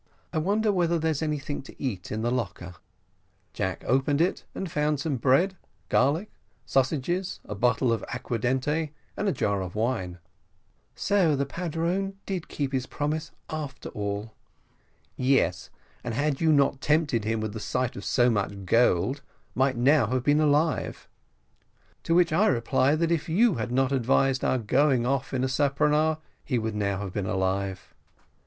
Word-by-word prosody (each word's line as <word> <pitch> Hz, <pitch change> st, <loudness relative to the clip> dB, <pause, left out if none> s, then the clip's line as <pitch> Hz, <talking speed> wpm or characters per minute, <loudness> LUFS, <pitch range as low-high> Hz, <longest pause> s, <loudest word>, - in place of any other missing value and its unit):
I -, -, +1 dB
wonder 210 Hz, +6 st, +1 dB
whether 170 Hz, -3 st, +1 dB
there 160 Hz, 0 st, +1 dB
is 150 Hz, -, -2 dB
anything 150 Hz, -2 st, -2 dB
to 135 Hz, -, -14 dB
eat 100 Hz, -10 st, -4 dB
in 110 Hz, +1 st, -2 dB
the 120 Hz, -, +1 dB
locker?" 90 Hz, -7 st, -3 dB, 0.8 s
Jack 95 Hz, 0 st, -3 dB
opened 135 Hz, +3 st, +2 dB
it, 175 Hz, +3 st, 0 dB
and 190 Hz, -4 st, -4 dB
found 150 Hz, -1 st, 0 dB
some 140 Hz, -2 st, -1 dB
bread, 140 Hz, +10 st, +3 dB, 0.3 s
garlic, 150 Hz, +11 st, +2 dB, 0.3 s
sausages, 155 Hz, +8 st, 0 dB
a -, -, -5 dB
bottle 120 Hz, +3 st, +2 dB
of 115 Hz, -, -2 dB
aquadente, 130 Hz, +6 st, -1 dB, 0.2 s
and 205 Hz, -, -2 dB
a -, -, +3 dB
jar 100 Hz, -6 st, 0 dB
of 95 Hz, 0 st, -6 dB
wine. 105 Hz, -6 st, -1 dB, 0.8 s
"So 190 Hz, -7 st, +2 dB
the 140 Hz, 0 st, 0 dB
padrone 175 Hz, +5 st, -2 dB
did 185 Hz, -4 st, -4 dB
keep 140 Hz, -2 st, -3 dB
his 130 Hz, -1 st, -1 dB
promise, 150 Hz, +1 st, -2 dB, 0.2 s
after 150 Hz, -3 st, -5 dB
all." 105 Hz, +1 st, -4 dB, 0.8 s
"Yes, 125 Hz, -10 st, +1 dB, 0.3 s
and 115 Hz, -2 st, -3 dB
had 145 Hz, +2 st, 0 dB
you 160 Hz, -1 st, +4 dB
not 140 Hz, -2 st, +3 dB
tempted 150 Hz, -7 st, +2 dB
him 110 Hz, +1 st, -1 dB
with 110 Hz, -1 st, -3 dB
the 110 Hz, -, -5 dB
sight 125 Hz, +3 st, -2 dB
of -, -, -7 dB
so 125 Hz, -1 st, +3 dB
much 100 Hz, -2 st, -2 dB
gold, 120 Hz, +5 st, +2 dB, 0.3 s
might 130 Hz, 0 st, +1 dB
now 130 Hz, 0 st, +4 dB
have 125 Hz, +2 st, -1 dB
been 145 Hz, +2 st, +3 dB
alive." 150 Hz, +2 st, +1 dB, 1.0 s
"To 165 Hz, -, +2 dB
which 175 Hz, -2 st, +4 dB
I 205 Hz, +7 st, +4 dB
reply, 130 Hz, +3 st, +2 dB
that 165 Hz, +1 st, 0 dB
if 165 Hz, -1 st, 0 dB
you 215 Hz, +6 st, +4 dB
had 120 Hz, +2 st, -3 dB
not 130 Hz, +1 st, +2 dB
advised 135 Hz, +1 st, +2 dB
our 130 Hz, -, +2 dB
going 130 Hz, +2 st, +2 dB
off 135 Hz, +1 st, -1 dB
in 130 Hz, -1 st, -1 dB
a -, -, +2 dB
speronare, 150 Hz, +3 st, +2 dB, 0.3 s
he 130 Hz, -, -1 dB
would 110 Hz, -1 st, -2 dB
now 100 Hz, -1 st, -1 dB
have 95 Hz, -3 st, -5 dB
been 100 Hz, -3 st, -2 dB
alive." 95 Hz, 0 st, -2 dB
135 Hz, 165 wpm, -27 LUFS, 115-155 Hz, 1.0 s, you